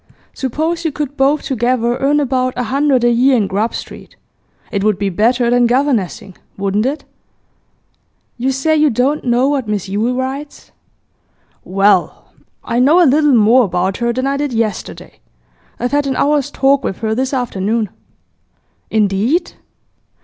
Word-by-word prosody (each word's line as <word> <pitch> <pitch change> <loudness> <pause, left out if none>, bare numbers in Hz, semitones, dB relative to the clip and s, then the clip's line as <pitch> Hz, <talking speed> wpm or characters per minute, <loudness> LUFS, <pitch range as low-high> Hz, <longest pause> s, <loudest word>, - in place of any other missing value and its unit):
Suppose 315 +6 -2
you 320 - -1
could 290 -1 -5
both 280 +2 +1
together 240 -1 0
earn 290 +2 +2
about 255 -2 -1
a 250 - -1
hundred 275 -3 +2
a 240 - +4
year 255 +2 +3
in 215 - +1
Grub 205 +4 -2
Street, - - -9 0.6
it 200 -2 -2
would 210 -2 +2
be 200 0 -1
better 235 +5 +1
than 245 0 +3
governessing; 240 -8 -1 0.2
wouldn't 200 +4 0
it?' 290 +3 -4 1.3
'You 255 +3 -1
say 270 +4 0
you 305 -1 +3
don't 265 +6 0
know 245 +1 +2
what 275 -5 -1
Miss 205 -3 -2
Yule 215 +6 -1
writes?' 270 +3 -6 0.9
'Well, 195 -1 0 0.3
I 235 - -1
know 290 +8 +5
a 355 - +6
little 295 0 +3
more 230 +3 +5
about 185 +1 -1
her 235 0 0
than 255 +2 -2
I 275 0 0
did 285 -2 -2
yesterday. 225 -2 -4 0.6
I've 245 - -2
had 290 0 +1
an 265 - -1
hour's 290 0 +1
talk 275 +1 +2
with 190 - -3
her 220 -1 -1
this 260 +3 -1
afternoon.' 225 -4 -1 1.0
'Indeed? 220 - 0
250 Hz, 155 wpm, -16 LUFS, 220-280 Hz, 1.3 s, a